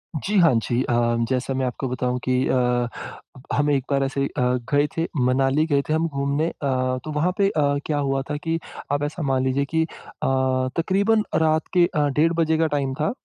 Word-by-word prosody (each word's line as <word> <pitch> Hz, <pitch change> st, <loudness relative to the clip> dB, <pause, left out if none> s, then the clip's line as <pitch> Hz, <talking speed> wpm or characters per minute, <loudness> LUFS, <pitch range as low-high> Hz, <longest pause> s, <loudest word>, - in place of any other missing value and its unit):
जी, 200 Hz, +8 st, -1 dB
हाँ 165 Hz, -6 st, +5 dB
जी। 120 Hz, +2 st, 0 dB
अ, 120 Hz, -, -1 dB, 0.4 s
जैसा 130 Hz, +1 st, -1 dB
मैं 130 Hz, 0 st, -1 dB
आपको 125 Hz, +2 st, -3 dB
बताऊँ 125 Hz, 0 st, -1 dB
कि 130 Hz, -, 0 dB
अ, 125 Hz, -1 st, +1 dB, 0.7 s
हम 145 Hz, +1 st, +2 dB
एक 135 Hz, -2 st, +1 dB
बार 135 Hz, 0 st, +2 dB
ऐसे 135 Hz, +1 st, -1 dB
अ, -, -, -5 dB, 0.4 s
गए 145 Hz, +1 st, +3 dB
थे 165 Hz, 0 st, 0 dB, 0.2 s
मनाली 135 Hz, +4 st, +2 dB
गए 140 Hz, -2 st, +2 dB
थे -, -, +2 dB
हम 165 Hz, +1 st, +1 dB
घूमने 140 Hz, +2 st, -1 dB
अ, -, -, -8 dB, 0.5 s
तो 155 Hz, -, -5 dB
वहाँ 155 Hz, +5 st, +1 dB
पे 200 Hz, -, +3 dB
अ, 155 Hz, -, 0 dB, 0.2 s
क्या 150 Hz, -, -1 dB
हुआ 135 Hz, -1 st, 0 dB
था 150 Hz, -, -2 dB
कि 165 Hz, 0 st, -1 dB, 0.3 s
आप 145 Hz, 0 st, 0 dB
ऐसा 155 Hz, +3 st, -4 dB
मान 130 Hz, -1 st, +1 dB
लीजिए 135 Hz, +2 st, +1 dB
कि 160 Hz, -, +3 dB
अ, 160 Hz, -, -4 dB, 0.9 s
तकरीबन 200 Hz, +5 st, +2 dB
रात 160 Hz, 0 st, +2 dB
के 175 Hz, -1 st, +5 dB
अ, 150 Hz, -3 st, 0 dB
डेढ़ 155 Hz, +5 st, +2 dB
बजे 160 Hz, 0 st, +2 dB
का 160 Hz, 0 st, +2 dB
टाइम 135 Hz, -2 st, -1 dB
था। 155 Hz, -, +1 dB
145 Hz, 210 wpm, -23 LUFS, 135-160 Hz, 0.9 s, हाँ